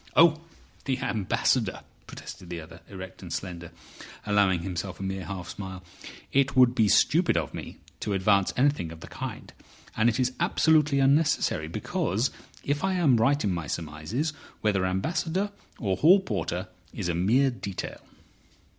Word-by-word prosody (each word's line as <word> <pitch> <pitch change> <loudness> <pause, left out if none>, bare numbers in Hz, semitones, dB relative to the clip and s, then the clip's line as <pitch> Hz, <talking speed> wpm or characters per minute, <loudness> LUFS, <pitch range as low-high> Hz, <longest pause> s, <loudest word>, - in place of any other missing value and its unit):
"Oh! 160 -1 +6 0.4
The 130 -2 0
Ambassador!" 105 -6 0 0.3
protested 90 - -10
the 85 -1 -4
other, 80 +1 -11
erect 95 -2 -9
and 90 -3 -9
slender, 85 -2 -5 0.5
allowing 100 -4 +3
himself 95 0 -4
a - - -5
mere 95 -1 -3
half 90 -2 -6
smile. 95 -2 -7 0.5
"It 140 0 +2
would 125 -2 +6
be 110 -4 +3
stupid 160 - +4
of 75 -6 -2
me - - -7 0.2
to 105 - -2
advance 100 0 +3
anything 135 - +2
of 80 -1 -11
the - - -9
kind. - - -7 0.4
And 110 +2 +4
it 115 - -1
is 130 0 +1
absolutely 155 -3 +3
unnecessary, 135 - +2
because 95 - -1 0.3
if 145 +3 -1
I 190 0 +1
am 155 -9 +4
right 140 +6 +2
in 100 - +1
my 85 -4 -4
surmises, 85 - -3 0.3
whether 95 -3 +1
ambassador 165 - -1 0.3
or 95 -5 -1
hall 180 - +7
porter 105 - -3 0.2
it's - - -4
a 85 - 0
mere 115 +11 +3
detail." 100 -6 -6
105 Hz, 155 wpm, -27 LUFS, 90-140 Hz, 0.5 s, hall